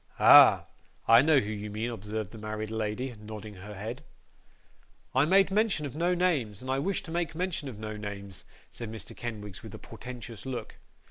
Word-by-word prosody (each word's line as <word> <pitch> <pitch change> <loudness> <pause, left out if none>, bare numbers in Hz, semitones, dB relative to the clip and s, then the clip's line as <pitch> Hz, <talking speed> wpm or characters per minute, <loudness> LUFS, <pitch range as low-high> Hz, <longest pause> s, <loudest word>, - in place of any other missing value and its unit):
'Ah! - - +8 0.4
I 115 +1 +8
know 155 +1 +5
who 105 -3 -3
you 105 0 -5
mean,' 110 +3 -3
observed 105 -2 -5
the 115 - -10
married 110 0 -4
lady, 110 +4 -2
nodding 105 0 -8
her 105 +2 -10
head. 110 +5 -6 1.1
'I 130 +3 +4
made 195 +3 +4
mention 205 -6 +1
of 140 - -6
no 175 +3 +1
names, 145 - 0
and 130 +1 -4
I 135 - +1
wish 195 +7 -1
to 160 - -9
make 170 -1 -2
mention 170 -5 -2
of 115 - -9
no 110 0 -5
names,' 100 -2 -7 0.3
said 115 -2 -7
Mr. 110 -3 -7
Kenwigs, 105 -5 -6
with - - -9
a - - -7
portentous 115 -3 -9
look. 130 -2 -6
115 Hz, 190 wpm, -29 LUFS, 105-145 Hz, 1.1 s, Ah